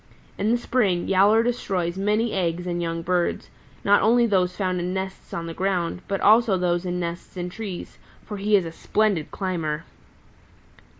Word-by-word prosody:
In 205 +2 -1
the 240 - +3
spring 215 -8 0
Yowler 200 +4 +5
destroys 190 -8 -1
many 210 +4 0
eggs 175 -2 -1
and 175 -1 -2
young 165 0 -3
birds, 180 0 -1 0.3
not 205 0 +5
only 235 +2 +4
those 185 -4 +1
found 185 -2 0
in 180 +2 -2
nests 190 0 -5
on 165 - -4
the 165 - -5
ground, 180 -1 -1
but 195 -1 -2
also 220 -2 +5
those 175 0 0
in 180 0 -2
nests 170 +1 -5
in 180 0 -4
trees, 200 -3 -7 0.3
for 210 - -6
he 205 +2 +2
is 190 -4 +3
a 165 - -5
splendid 200 -2 0
climber. 165 -5 -3
185 Hz, 175 wpm, -24 LUFS, 175-210 Hz, 0.3 s, Yowler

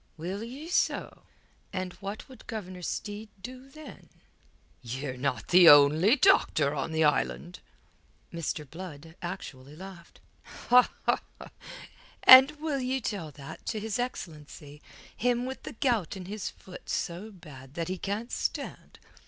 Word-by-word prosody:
"Will 185 +6 -5
ye 265 +7 -8
so? 350 - -1 0.5
And 185 -1 -4
what 200 +2 -6
would 255 -4 -15
Governor 185 -6 -6
Steed 205 +5 -5
do, 255 +5 -10
then?" 310 +2 -13 0.7
"Ye're 130 +2 -5
not 125 0 -3
the 175 -1 +8
only 150 - +7
doctor 255 - +3
on 145 +2 -3
the 160 0 +1
island." 175 +3 0 0.7
Mr. 160 -3 -4
Blood 160 0 -10
actually 150 -6 -7
laughed. 185 -1 -12 2.0
"And 260 +2 +11
will 300 -3 -2
ye 260 +1 -1
tell 200 -9 -4
that 135 -1 -10
to 220 - -2
his 220 +1 -3
excellency, 150 - -7 0.3
him 245 +1 0
with 265 +1 -6
the - - -8
gout 220 - 0
in 185 - -8
his 205 +2 -4
foot 185 - -13
so 175 +6 -3
bad 145 -8 -13
that 165 -1 -3
he 185 0 -4
can't 210 +4 -4
stand? - - -4
185 Hz, 135 wpm, -28 LUFS, 155-230 Hz, 2.0 s, And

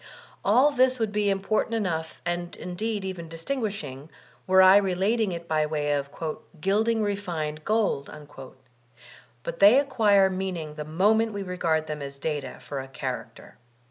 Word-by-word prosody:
AH 250 +9 +5
tfiis 255 -2 +3
would 220 -2 0
be 210 -1 +1
important 200 +3 0
enough 165 -7 -3
and 175 0 -3
indeed 205 +3 -4
even 175 -3 -6
dis 165 0 -10
tingosshing, 200 - -4 0.4
were 190 0 +6
I 190 +1 +8
relating 200 +2 +1
it 170 -1 -6
by 155 -1 +1
way 150 -1 -1
of 140 -1 -2 0.5
"gilding 215 +5 +1
refined 170 -7 -3
gold''; 210 -10 0 1.3
but - - -5
they 205 +6 +8
acquire 210 -8 +4
meaning 185 -5 -4
the 150 0 -6
moment 210 +8 +2
we 200 -1 -4
regard 165 -4 0
them 150 -1 -5
as 140 0 -7
data 145 -3 -4
for 140 - -5
a 135 - -6
character. 135 - -7
190 Hz, 150 wpm, -26 LUFS, 155-210 Hz, 1.3 s, I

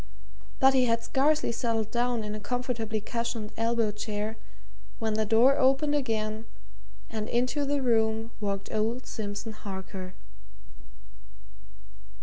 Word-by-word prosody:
But 265 0 +6
he 260 -1 +4
had 230 -1 +1
scarcely 290 +1 +2
settled 225 -2 -1
down 240 -1 +1
in 210 0 -4
a 215 - -4
comfortably 225 -1 -2
cushioned 230 -1 -3
elbow 230 -1 +1
chair 210 +1 -3 0.6
when 220 -1 -1
the 215 0 0
door 240 +6 +5
opened 275 +2 +4
again 220 -5 -1 0.6
and 215 0 -4
into 255 +4 +1
the 280 -1 0
room 225 -1 +2
walked 200 -2 -3
old 225 +3 0
Simpson 210 +1 -4
Harker. 190 -2 -7
225 Hz, 125 wpm, -28 LUFS, 215-250 Hz, 0.6 s, But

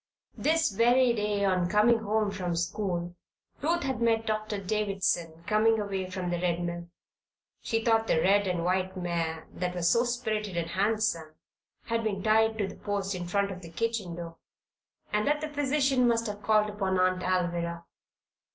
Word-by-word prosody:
This 320 -4 +2
very 240 +4 +4
day, 210 -2 0
on 185 -2 +1
coming 220 +3 +4
home 215 -1 0
from 180 -3 -3
school, 175 0 -2 0.5
Ruth 335 +3 +1
had 265 -3 -2
met 225 -1 +2
Doctor 215 -1 -2
Davison 190 -5 -1
coming 220 +1 +3
away 195 -3 -3
from 185 -2 -3
the 175 0 -2
Red 175 -1 0
Mill. 170 0 -5 0.7
She 225 0 -1
thought 225 -1 +3
the - - +3
red 200 +3 +3
and 175 -2 -1
white 185 +1 0
mare, 165 -2 -2
that 180 0 -3
was 175 -1 +2
so 235 - +4
spirited 220 -6 -2
and 170 0 -2
handsome, 195 -6 0 0.5
had 230 0 -1
been 200 -3 -2
tied 220 0 +3
to 205 -3 0
the - - -9
post 200 -1 -2
in 175 -1 -5
front 200 +2 0
of 185 -1 -8
the 170 - -10
kitchen 215 -1 -2
door, 165 -1 -8 0.8
and 210 +3 +1
that 295 +1 +2
the 310 0 -4
physician 275 -3 +2
must 230 -1 +2
have 210 -1 -5
called 215 0 +2
upon 190 -3 -1
Aunt 185 0 +2
Alvirah. 170 -2 -1
200 Hz, 175 wpm, -28 LUFS, 180-225 Hz, 0.8 s, very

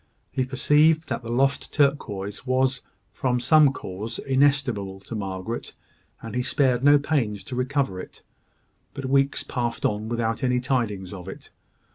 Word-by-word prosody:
He 130 - 0
perceived 150 +4 +3
that - - -2
the 115 - -8
lost 135 +3 +1
turquoise 105 -9 0
was, 130 0 +1 0.3
from 125 -1 0
some 145 +3 +5
cause, 110 -2 -6
inestimable 130 -8 +1
to 110 - -9
Margaret, 100 +2 -4 0.5
and 115 - -7
he 125 - 0
spared 130 -1 +1
no 145 +1 +7
pains 130 -9 -1
to 125 - -7
recover 125 -6 -1
it: - - -11 0.7
but 140 - -5
weeks 135 +1 +2
passed 120 -2 -3
on 105 +1 -1
without 115 -1 -1
any 125 -1 +2
tidings 115 -8 -2
of 90 -2 -9
it. - - -11
125 Hz, 150 wpm, -25 LUFS, 110-140 Hz, 0.7 s, no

